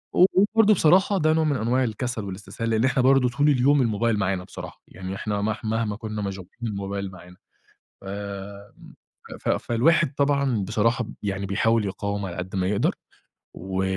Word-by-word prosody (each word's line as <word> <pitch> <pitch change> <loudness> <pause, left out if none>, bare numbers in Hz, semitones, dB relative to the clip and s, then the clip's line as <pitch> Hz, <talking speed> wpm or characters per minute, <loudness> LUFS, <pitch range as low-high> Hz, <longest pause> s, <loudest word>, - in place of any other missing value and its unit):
و 180 - +7
وبرضو 215 +2 +4
بصراحة 190 +3 +4
ده 155 -3 +3
نوع 160 0 +2
من 150 -2 +1
أنواع 125 +2 +1
الكسل 120 0 -3
والاستسهال، 100 +4 -5
لأن 110 +2 +2
إحنا 130 0 +2
برضو 135 -1 +5
طول 145 +5 +2
اليوم 140 +1 +4
الموبايل 115 -1 +1
معانا 95 -2 -1
بصراحة، - - -10
يعني 95 0 -7
إحنا 105 0 -2
مح 110 +2 -2
مهما 110 -1 -1
كنّا 110 -1 -5
مشغولين 95 -2 -6
الموبايل 100 -2 -4
معانا. 90 -1 -14 0.6
فَ - - -17
امم، 100 0 -8 0.5
ف - - -2
فالواحد 150 +7 +2
طبعًا 140 -7 +1
بصراحة 115 +5 +1 0.2
يعني 100 -1 -2
بيحاول 110 +3 +1
يقاوم 100 +1 -3
على 85 -2 -6
قد 90 +2 -5
ما 95 -1 0
يقدر، 100 +1 +1 0.6
و 95 +1 -3
110 Hz, 170 wpm, -24 LUFS, 100-130 Hz, 0.6 s, و